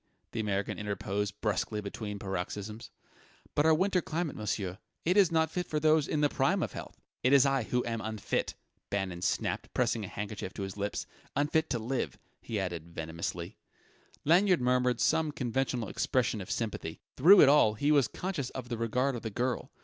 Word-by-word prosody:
the 115 - -4
American 100 -2 -1
interposed 105 0 -3
brusquely 105 +1 0
between 105 0 -5
paroxysms. 100 +3 -5 0.6
"But 145 +2 +3
our 160 - +6
winter 185 +2 +2
climate, 160 -1 -2
monsieur 95 -3 -3 0.3
it 180 +3 +3
is 195 -5 +5
not 160 -1 +2
fit 180 -1 -2
for 155 - -1
those 155 -1 +4
in 150 - 0
the 145 - +5
prime - - +1
of - - -3
health - - -8
" - - -61
"It 130 +3 +4
is 140 0 +7
I 135 -1 +2
who 125 +1 0
am 115 -1 -2
unfit!" 110 -2 -2 0.3
Bannon 95 -3 -2
snapped, - - -1
pressing 120 -3 +1
a - - -4
handkerchief 105 -1 -5
to 100 - -4
his 95 -1 -5
lips 100 0 -3 0.3
"unfit 155 +3 +1
to 125 - 0
live!" 120 +4 -2 0.2
he 110 - -4
amended 85 -4 -3
venomously. 85 +4 -4 0.7
Lanyard 180 +3 +5
murmured 125 -1 +2
some 160 -2 +2
conventional 125 -2 -1
expression 120 -4 0
of 90 - -8
sympathy. 105 -8 -3 0.2
Through 180 +9 +8
it - - +8
all 125 -7 +5
he 145 +7 +1
was 140 -5 +5
conscious 170 -7 -3
of 125 -2 -7
the 120 -2 -3
regard 125 +4 +1
of 120 - -5
the 110 - -3
girl. 120 +3 -2
120 Hz, 190 wpm, -31 LUFS, 105-145 Hz, 0.7 s, Through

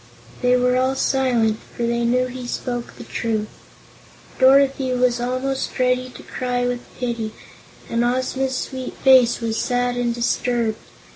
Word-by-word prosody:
They 250 0 +4
were 250 0 +2
all 260 +1 +1
silent, 245 -5 +1 0.2
for 240 - -2
they 235 0 0
knew 250 +2 +2
he 250 0 -7
spoke 245 -1 -4
the - - -9
truth. 220 -2 -2 0.9
Dorothy 270 0 +4
was 245 -1 +1
almost 255 +2 -2
ready 255 0 +1
to 250 - -12
cry 245 -1 -2
with 245 0 -1 0.2
pity 235 -3 -3 0.5
and 230 +1 0
Ozma's 260 +2 0
sweet 260 0 -5
face 255 -3 +5
was 225 -1 -1
sad 245 -1 0
and 240 -1 0
disturbed. 235 -1 0
250 Hz, 145 wpm, -21 LUFS, 235-255 Hz, 0.9 s, face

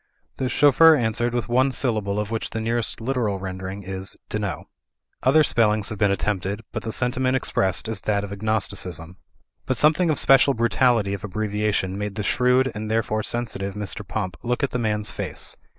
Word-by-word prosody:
The 130 - -1
chauffeur 145 +5 +6
answered 120 -1 0
with 120 - -1
one 130 +3 +2
syllable 110 -6 0
of 105 +1 -3
which 115 - -2
the 115 - -4
nearest 115 0 -2
literal 115 -4 -1
rendering 95 +1 -6
is 95 +1 -6
"dno." 105 -5 -3 0.6
Other 155 +4 +5
spellings 110 -6 +2
have 110 - -6
been 105 - +3
attempted, 100 +1 -1
but - - -4
the 110 - -4
sentiment 130 +2 0
expressed 95 -6 +1
is 110 -4 -2
that 100 -1 0
of 100 - -6
agnosticism. 95 -5 -2 0.5
But 130 - 0
something 155 +6 +3
of 155 - +1
special 135 0 +5
brutality 115 -3 +2
of 100 - -5
abbreviation 105 -1 -1
made 105 -1 -4
the 105 - -3
shrewd, 125 +5 +2
and 110 0 -5
therefore 110 -1 0
sensitive, 105 -4 -3
Mr. 105 +1 -3
Pump 95 -2 -4
look 125 +4 -2
at 140 - 0
the 125 - -2
man's 105 -2 -1
face. - - -4
110 Hz, 180 wpm, -23 LUFS, 100-125 Hz, 0.6 s, chauffeur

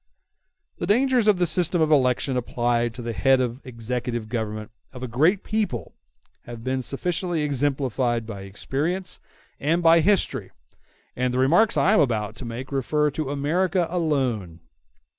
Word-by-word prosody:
The - - -2
dangers 245 +1 +3
of 210 -3 +5
the 180 - +2
system 175 +1 +1
of 155 -1 +2
election 130 -1 +2
applied 120 -1 0
to 125 - -7
the 115 0 -3
head 135 +4 +3
of 125 +1 -2
the - - -11
executive 120 -1 -4
government 110 -1 -4 0.2
of 125 -1 -8
a - - -3
great 155 - +2
people 215 -4 -2 0.5
have 120 -1 -9
been 130 +1 -1
sufficiently 170 +4 -2
exemplified 135 -4 0
by 105 -3 -7
experience 150 - -3 0.4
and 165 +4 +1
by 165 0 +7
history, 195 +4 +1 0.7
and 125 0 0
the 125 - -2
remarks 170 +12 +4
I 200 - +4
am 215 - +5
about 110 -6 0
to 130 - -7
make 120 +4 -6
refer 150 +2 +1
to 150 -1 -3
America 170 +6 +1
alone. 130 - -1
135 Hz, 160 wpm, -24 LUFS, 120-170 Hz, 0.7 s, by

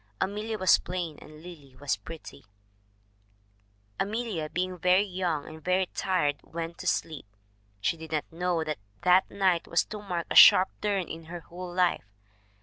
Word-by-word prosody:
Amelia 215 +3 -2
was 185 -3 +5
plain 175 -4 -5
and 155 +1 -14
Lily 150 -7 -12
was 145 0 0
pretty: 160 -3 -11 1.6
"Amelia, 205 -7 -2
being 185 +1 -3
very 180 +3 +4
young 180 -6 -2
and 160 0 -11
very 185 +1 +2
tired, 150 -7 0
went 165 0 -7
to - - -6
sleep. 155 -10 -1 0.5
She 165 +10 0
did 160 0 -10
not 155 -2 -1
know 175 0 -1
that 155 -5 -4 0.2
that 180 +1 +5
night 185 -4 +1
was 170 - +2
to 210 -1 -7
mark 180 -4 -3
a - - -1
sharp 185 - +9
turn 200 -4 0
in 165 0 -8
her 170 +1 -8
whole 175 +2 -9
life. 175 - 0
175 Hz, 160 wpm, -28 LUFS, 160-185 Hz, 1.6 s, sharp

